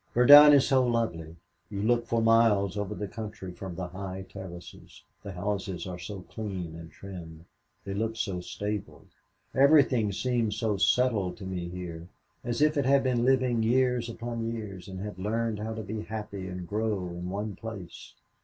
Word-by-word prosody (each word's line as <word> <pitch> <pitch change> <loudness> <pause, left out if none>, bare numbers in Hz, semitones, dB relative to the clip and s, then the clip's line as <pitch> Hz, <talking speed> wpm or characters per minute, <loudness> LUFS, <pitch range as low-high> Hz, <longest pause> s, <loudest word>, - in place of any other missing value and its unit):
"Verdun 145 +5 +10
is 140 -2 +5
so 130 -2 +4
lovely. 110 -10 -1 0.3
You 100 -1 -4
look 120 +1 +2
for 115 -1 +1
miles 110 -4 +4
over 105 -2 -3
the 105 - -4
country 105 -3 -7
from 90 0 -7
the 90 -1 -5
high 95 +1 -6
terraces 90 -3 -11 0.2
the 100 -2 -7
houses 95 0 -3
are 90 -2 -6
so 95 +2 -7
clean 95 -5 -6
and 85 0 -9
trim. 85 -4 -10 0.4
They 100 - -4
look 110 +2 -2
so 100 -5 -2
stable 105 +2 -5 0.5
everything 135 -6 +5
seems 115 0 0
so 110 -3 0
settled 105 -4 +2
to 100 - -8
me 90 -2 -4
here 85 -2 -7 0.4
as 120 +4 0
if 150 0 +3
it 140 - +1
had 140 +1 +4
been 125 -2 +1
living 130 -3 +3
years 125 +1 +2
upon 115 0 -4
years 100 -6 -7
and 95 -1 -7
had 105 -2 -6
learned 110 +2 -1
how 110 +1 -4
to 110 - -5
be 105 +2 -4
happy 105 -3 -6
and 90 -1 -6
grow 105 -3 -1
in 90 +1 -6
one 100 +1 -4
place. 100 -5 -9
105 Hz, 175 wpm, -28 LUFS, 95-115 Hz, 0.5 s, Verdun